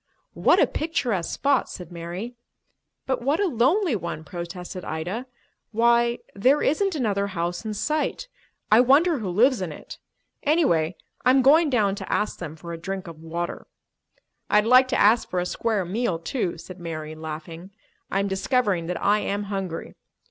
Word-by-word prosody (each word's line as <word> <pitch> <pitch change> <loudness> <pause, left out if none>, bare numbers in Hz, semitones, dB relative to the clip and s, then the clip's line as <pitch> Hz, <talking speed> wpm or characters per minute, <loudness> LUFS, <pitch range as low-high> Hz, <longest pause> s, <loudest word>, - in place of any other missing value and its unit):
"What - - +4
a - - +6
picturesque 245 - -2
spot!" 280 -2 +1
said 180 -2 -9
Mary. 175 +7 -6 0.7
"But 260 -2 -1
what 280 +7 +1
a 410 - +2
lonely 315 - +2
one!" 170 -4 -5
protested 175 +3 -7
Ida. 180 +11 -4 0.4
"Why, 235 +1 +3 0.2
there 260 +9 +3
isn't 380 +5 +1
another 205 -7 0
house 175 -1 -3
in 215 -1 -3
sight. 305 - -1 0.4
I 215 - +7
wonder 285 +5 +4
who 205 -4 -3
lives 235 +6 +3
in 180 -4 -3
it. - - -10 0.4
Anyway, 190 - +2 0.3
I'm 260 +1 +5
going 305 +4 +6
down 215 -7 +2
to 200 - -6
ask 210 - -1
them 160 -3 -6
for 170 +1 -8
a 165 - -6
drink 190 +2 -5
of 165 -3 -10
water." 170 +2 -5 0.8
"I'd 210 0 +4
like 255 +2 +6
to 255 - 0
ask 220 +3 +4
for 180 - -1
a 180 - -1
square 210 +1 -1
meal, 190 -1 -1
too," 170 +1 -3
said 180 +2 -10
Mary, 155 -2 -5
laughing. 160 +3 -8 0.4
"I 195 - 0
am 200 - -1
discovering 195 -3 0
that 180 -1 -3
I 210 +1 +3
am 205 0 -2
hungry. 185 -4 -4
200 Hz, 170 wpm, -24 LUFS, 170-255 Hz, 0.8 s, I